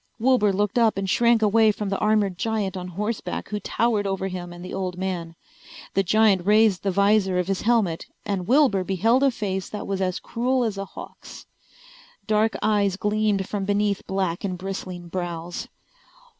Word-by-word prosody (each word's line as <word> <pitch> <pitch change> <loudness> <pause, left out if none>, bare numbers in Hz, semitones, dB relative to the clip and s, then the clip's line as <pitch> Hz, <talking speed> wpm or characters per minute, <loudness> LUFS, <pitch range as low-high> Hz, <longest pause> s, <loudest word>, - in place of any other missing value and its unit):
Wilbur 240 -3 +3
looked 205 +4 0
up 225 -4 +3
and 195 0 -2
shrank 235 +3 +3
away 215 +1 +4
from 205 -1 -4
the 195 - -1
armored 210 -3 +2
giant 210 -1 -2
on 180 -1 -5
horseback 210 +5 -4
who 210 - -3
towered 215 -2 0
over 195 0 -2
him 180 -1 -6
and 175 +1 -9
the - - -7
old 185 -2 -3
man. 180 -3 -4 0.6
The 195 - +3
giant 200 -1 +3
raised 210 -1 +4
the 200 - -1
visor 200 0 +2
of 180 - +1
his 195 -1 -1
helmet 215 -8 +1 0.2
and 190 -3 -2
Wilbur 255 -7 +4
beheld 215 +8 +2
a 275 - +5
face 195 -6 -3
that 210 - -6
was 195 -1 -2
as 185 -1 -1
cruel 250 +2 0
as 210 -4 -2
a 195 - -3
hawk's. - - -11 0.8
Dark 215 +1 +1
eyes 205 -3 +2
gleamed 210 -2 0
from 205 -2 -3
beneath 205 0 0
black 190 -3 -2
and 185 -3 -2
bristling 185 -2 -6
brows. 175 +4 -5
200 Hz, 180 wpm, -24 LUFS, 185-215 Hz, 0.8 s, a